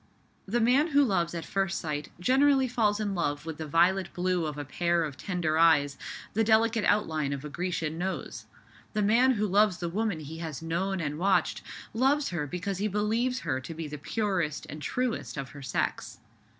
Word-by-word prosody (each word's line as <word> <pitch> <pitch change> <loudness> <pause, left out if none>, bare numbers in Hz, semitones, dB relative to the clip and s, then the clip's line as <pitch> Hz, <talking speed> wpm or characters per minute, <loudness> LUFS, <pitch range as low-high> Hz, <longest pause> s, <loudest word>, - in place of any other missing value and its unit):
The 235 +5 +1
man 255 +7 +4
who 285 -3 +4
loves 175 -8 0
at 165 -3 -4
first 195 0 -1
sight 150 -2 -4
generally 265 +5 +4
falls 215 -4 +1
in 205 -2 -1
love 150 -4 -1
with 160 -2 -5
the 155 - -4
violet 175 +4 +3
blue 180 -2 0
of 150 -1 -5
a 145 - -4
pair 170 +4 +1
of 150 -4 -4
tender 160 -1 -1
eyes, 145 -4 +4 0.4
the 225 - +2
delicate 225 0 +3
outline 155 -9 +1
of 140 +1 -5
a - - -5
Grecian 165 -1 -3
nose. 190 +1 -4 0.5
The 210 -1 +1
man 240 +6 +4
who 215 -2 0
loves 205 -1 +3
the 175 -1 -3
woman 200 -2 -1
he 155 +2 -8
has 160 -4 -5
known 180 +4 -2
and 150 -1 -3
watched, 195 +2 +2 0.3
loves 275 +5 +2
her 165 -5 -3
because 185 +4 -3
he 210 - +1
believes 220 +5 0
her 130 0 -2
to 160 +5 -8
be 160 -1 -5
the 150 0 -7
purest 165 -1 -1
and 150 +1 -7
truest 250 -3 -2
of 135 -1 -4
her 145 - -11
sex. 125 -5 -2
180 Hz, 195 wpm, -28 LUFS, 155-215 Hz, 0.5 s, man